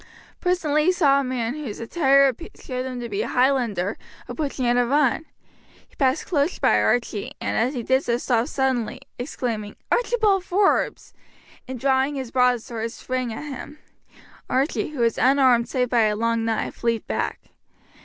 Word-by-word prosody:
Presently 310 -5 +1
he 365 - +5
saw 285 -7 +3
a - - 0
man, 250 -2 -2
whose 280 -8 -6
attire 275 +1 +3 0.3
showed 255 -1 -4
him 255 -1 -5
to 240 - -4
be 210 -2 -2
a 230 - -2
Highlander, 240 -8 +1 0.3
approaching 280 -4 -3
at 240 0 +3
a 245 - +4
run; 285 +4 +1 0.6
he - - -27
passed 265 +2 +1
close 305 -1 0
by - - +3
Archie, 230 -4 0
and - - -2
as 245 +6 +1
he 240 - -3
did 260 +4 +2
so 235 0 0
stopped 245 +1 0
suddenly, 260 -6 -1 0.2
exclaiming, 230 -5 -4 0.2
"Archibald 440 -6 +2
Forbes!" 390 +2 +1 0.5
and 260 -1 -6
drawing 270 +2 +1
his 260 -4 -5
broadsword 240 -3 0
sprang 255 0 -3
at 220 - -6
him. 290 +1 -8 0.7
Archie, 270 +5 0
who 295 -5 -5
was 230 -1 +1
unarmed 255 -3 +4
save 250 -2 0
by 235 -3 +4
a 210 0 +1
long 230 +1 0
knife, 225 +1 -3
leapt 230 -1 0
back. - - -2
255 Hz, 165 wpm, -23 LUFS, 235-280 Hz, 0.7 s, he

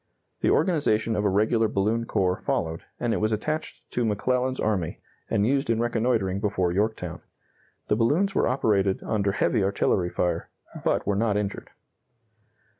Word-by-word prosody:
The - - +2
organization 115 - +2
of 105 - 0
a - - +4
regular 110 +3 +2
balloon 110 +4 0
corps 95 -4 0
followed, 80 0 -1 0.2
and 120 -2 0
it - - 0
was 110 +1 0
attached 155 +9 -3
to 120 - 0
McClellan's 125 +4 0
army, 95 -7 -1 0.3
and 100 - +2
used 135 +1 +1
in 115 -1 +2
reconnoitering 115 -5 0
before 100 -4 0
Yorktown. 105 +4 -2 0.7
The - - +2
balloons 155 - +2
were - - +2
operated 100 -7 +1
under 100 -3 0
heavy 110 0 +1
artillery 95 -2 +1
fire, 85 -1 -1 0.3
but - - +1
were 100 - +1
not 105 0 +1
injured. 100 -1 -3
110 Hz, 155 wpm, -26 LUFS, 100-120 Hz, 0.7 s, a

